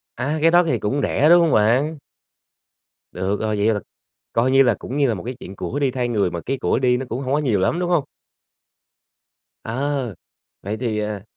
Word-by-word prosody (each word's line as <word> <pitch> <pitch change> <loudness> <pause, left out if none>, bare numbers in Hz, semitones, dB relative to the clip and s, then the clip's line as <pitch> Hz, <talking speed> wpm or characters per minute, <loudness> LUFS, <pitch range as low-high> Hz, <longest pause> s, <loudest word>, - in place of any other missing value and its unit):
À, 150 +4 -2
cái 165 - +5
đó 175 +1 +6
thì 130 -8 0
cũng 120 +8 -1
rẻ, 150 - +2
đúng 175 0 +7
hông 165 - +2
bạn? 125 +9 +2 1.1
Được 100 +2 -2
rồi. 110 -1 -1
Vậy 110 +2 +2
là 105 - -1 0.5
coi 120 +3 +2
như 135 +1 +6
là 120 -4 +3
cũng 135 - -6
như 140 -2 +3
là 115 - +1
một 90 - -7
cái 125 +2 -4
chuyện 95 -3 -9
của 110 +11 -4
đi 140 -2 +1
thay 125 -1 -2
người, 105 -6 +1
mà 85 - -4
cái 135 +1 -1
của - - +1
đi 125 -1 +2
nó 130 0 -4
cũng 125 +3 -3
hổng 130 0 -2
có - - +2
nhiều 120 -10 +1
lắm, 165 - +1
đúng 175 - -1
hông? 170 -5 +2 1.6
Ờ. 130 -2 -2 0.5
Vậy 105 +3 -4
thì, 110 -3 -2
à, 105 -2 -4
125 Hz, 220 wpm, -21 LUFS, 105-145 Hz, 1.6 s, đúng